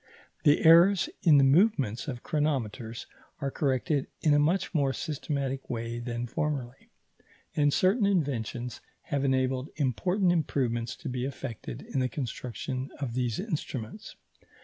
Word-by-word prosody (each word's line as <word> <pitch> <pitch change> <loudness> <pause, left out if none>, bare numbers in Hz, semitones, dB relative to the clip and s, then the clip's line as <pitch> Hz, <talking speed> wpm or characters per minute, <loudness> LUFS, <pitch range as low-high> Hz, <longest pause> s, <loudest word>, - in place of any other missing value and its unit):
The 145 +1 +4
errors 175 - +7
in 155 -5 +6
the 140 - +6
movements 135 - +3
of 125 -4 -5
chronometers 125 -7 -2 0.3
are 140 -2 -2
corrected 135 +1 0 0.2
in 150 - +4
a 145 - +5
much 170 +8 +1
more 140 -4 +2
systematic 140 -3 -3
way 115 0 -3
than 120 0 -3
formerly, 135 -2 -3 0.7
and 145 -1 +3
certain 200 - +3
inventions 125 - -1 0.3
have 140 -2 +1
enabled 130 0 +1
important 175 - +1
improvements 125 -7 0
to 155 - -9
be 125 -1 -2
effected 130 -4 -6
in 135 - -3
the 130 0 +1
construction 130 0 -4
of 135 -5 -3
these 120 -2 -1
instruments. 155 - -5
135 Hz, 135 wpm, -29 LUFS, 125-155 Hz, 0.7 s, errors